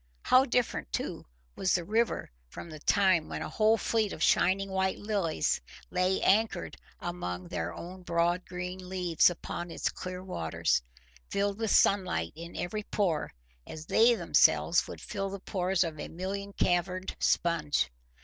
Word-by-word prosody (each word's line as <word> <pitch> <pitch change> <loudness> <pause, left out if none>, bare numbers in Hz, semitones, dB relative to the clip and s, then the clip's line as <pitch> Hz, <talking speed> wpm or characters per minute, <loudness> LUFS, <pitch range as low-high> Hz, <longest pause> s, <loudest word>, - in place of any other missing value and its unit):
How 255 +1 +5
different, 245 - -1
too, - - -4 0.3
was 190 - +1
the 175 - 0
river 220 - 0 0.2
from 165 - -9
the 155 - -8
time 185 -1 +3
when - - -4
a - - -5
whole 220 +1 +3
fleet 220 -2 0
of 155 - -3
shining 195 +1 +3
white 190 0 0
lilies 200 - 0 0.3
lay 185 +1 +1
anchored 205 -3 +2 0.2
among 90 - -4
their 85 +1 -3
own 180 - -9
broad 175 +1 +1
green 180 0 -6
leaves 180 -4 +3
upon 175 0 -5
its - - -1
clear 185 0 -6
waters, 80 - 0 0.5
filled 200 +1 -1
with 225 -1 -1
sunlight 185 - +3
in 170 +2 -9
every 195 +5 -3
pore, 190 -7 -1 0.4
as 155 0 -8
they 235 +6 +5
themselves - - +3
would - - -8
fill 195 -1 -3
the 200 0 -6
pores 185 -1 0
of 160 -3 -5
a - - -4
million 200 +3 -5
caverned 180 +1 0
sponge! 150 - +1
185 Hz, 155 wpm, -30 LUFS, 170-200 Hz, 0.5 s, How